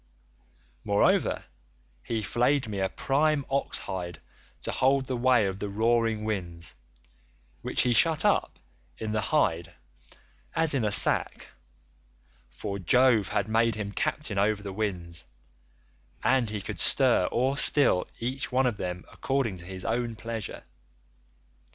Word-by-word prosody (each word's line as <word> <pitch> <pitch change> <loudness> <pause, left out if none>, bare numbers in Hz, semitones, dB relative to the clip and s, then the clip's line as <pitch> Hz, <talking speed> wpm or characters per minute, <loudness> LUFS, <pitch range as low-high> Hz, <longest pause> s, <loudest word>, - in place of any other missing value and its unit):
Moreover, 100 0 +2 0.6
he 110 - -3
flayed 125 +5 +1
me 100 -2 -4
a 95 0 0
prime 145 +1 +1
ox 140 +1 0
hide 90 -3 -5 0.4
to - - -3
hold 135 +1 +2
the 130 - -3
ways 125 -3 +3
of 95 0 -4
the 105 - -3
roaring 115 +1 +1
winds, 85 -6 -4 0.9
which - - +1
he 125 - +2
shut 160 +5 +4
up - - +1 0.4
in 110 -1 -4
the 105 0 0
hide 85 - 0 0.8
as 160 -2 +2
in 135 -4 0
a 105 - 0
sack—for 60 - -3
Jove 115 +2 +3
had 100 - -1
made 115 0 +2
him 105 -1 -4
captain 105 -1 -2
over 105 0 +1
the 100 -2 -6
winds, 90 -5 -3 1.0
and 130 -4 +2
he 105 -1 -4
could - - -6
stir - - +3
or 130 +3 +1
still 140 -10 +4
each 130 +2 -3
one 130 +1 +2
of 120 -5 0
them 90 -1 -5
according 135 -7 -1
to 85 - -10
his 95 0 -7
own 115 0 -1
pleasure. 115 -1 -6
110 Hz, 140 wpm, -27 LUFS, 95-125 Hz, 1.0 s, shut